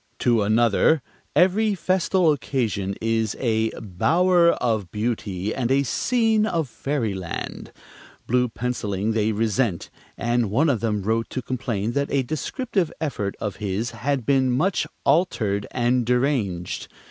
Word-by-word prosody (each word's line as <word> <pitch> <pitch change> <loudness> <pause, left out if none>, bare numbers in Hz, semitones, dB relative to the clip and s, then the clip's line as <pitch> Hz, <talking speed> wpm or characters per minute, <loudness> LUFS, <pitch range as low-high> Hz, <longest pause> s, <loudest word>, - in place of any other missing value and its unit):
To 120 -3 +2
another, 115 +7 +3 0.3
every 205 +3 +3
festal 185 -1 +2
occasion 110 -9 -1
is 115 -1 0
"a 110 -3 +1
bower 170 - +3
of 110 -7 -1
beauty 105 -2 -2
and 125 -3 -1
a 135 +1 +3
scene 220 - +1
of 165 -7 -1
fairyland." 110 - -4 0.5
Blue 125 +1 +2
penciling 110 -4 -2
they 110 0 +1
resent, 110 -3 0 0.3
and 120 -2 0
one 140 +9 +3
of 120 - -1
them 105 -3 -1
wrote 115 +2 0
to 130 - -4
complain 115 -4 -2
that 140 +3 -1
a 135 -1 +2
descriptive 180 - -2
effort 115 -10 -2
of 105 -2 -4
his 105 +3 -2
had 130 +1 -2
been 135 -2 +3
"much 165 +9 +1 0.2
altered 105 - +1
and 125 0 +1
deranged." 120 -8 -1
120 Hz, 135 wpm, -23 LUFS, 105-145 Hz, 0.5 s, another